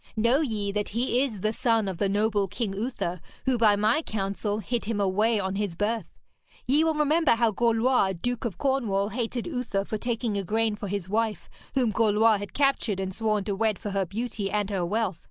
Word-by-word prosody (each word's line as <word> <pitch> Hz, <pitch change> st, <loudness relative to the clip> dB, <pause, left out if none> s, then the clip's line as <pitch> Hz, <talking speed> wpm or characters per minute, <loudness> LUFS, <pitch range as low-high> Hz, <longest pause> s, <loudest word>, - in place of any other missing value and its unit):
Know 235 Hz, +6 st, +3 dB
ye 215 Hz, -8 st, -1 dB
that 210 Hz, 0 st, -2 dB
he 240 Hz, +3 st, +1 dB
is 230 Hz, -8 st, -2 dB
the 215 Hz, +2 st, 0 dB
son 225 Hz, -4 st, +1 dB
of 185 Hz, -3 st, -4 dB
the 200 Hz, -, +1 dB
noble 205 Hz, 0 st, +1 dB
King 205 Hz, +1 st, -3 dB
Uther, 195 Hz, -5 st, -3 dB, 0.2 s
who 260 Hz, -3 st, +2 dB
by 215 Hz, -3 st, +5 dB
my 215 Hz, +8 st, +2 dB
counsel 205 Hz, -3 st, -2 dB
hid 230 Hz, +2 st, -3 dB
him 220 Hz, -1 st, -2 dB
away 210 Hz, +3 st, +2 dB
on 190 Hz, 0 st, -2 dB
his 200 Hz, -5 st, -2 dB
birth. 215 Hz, +5 st, -1 dB, 0.6 s
Ye 290 Hz, +5 st, +3 dB
will 320 Hz, -1 st, +1 dB
remember 300 Hz, 0 st, +3 dB
how 230 Hz, -1 st, +2 dB
Gorlois, 230 Hz, -2 st, +2 dB
Duke 245 Hz, +4 st, -2 dB
of 230 Hz, -5 st, -3 dB
Cornwall, 225 Hz, -8 st, 0 dB
hated 235 Hz, +1 st, -3 dB
Uther 245 Hz, -10 st, -2 dB
for 215 Hz, -, -3 dB
taking 235 Hz, -2 st, -2 dB
Igraine 215 Hz, +3 st, 0 dB
for 205 Hz, -1 st, -6 dB, 0.2 s
wife, 215 Hz, -1 st, -1 dB, 0.2 s
whom 250 Hz, -4 st, +2 dB
Gorlois 220 Hz, 0 st, +4 dB
had 205 Hz, -, -8 dB
captured 275 Hz, -8 st, +1 dB
and 190 Hz, 0 st, -3 dB
sworn 215 Hz, -1 st, 0 dB
to 200 Hz, 0 st, -2 dB
wed 215 Hz, 0 st, +1 dB
for 205 Hz, -, -5 dB
her 195 Hz, -2 st, 0 dB
beauty 215 Hz, 0 st, -3 dB
and 210 Hz, 0 st, -1 dB
her 190 Hz, -3 st, 0 dB
wealth. 195 Hz, -1 st, -1 dB
215 Hz, 200 wpm, -27 LUFS, 200-235 Hz, 0.6 s, by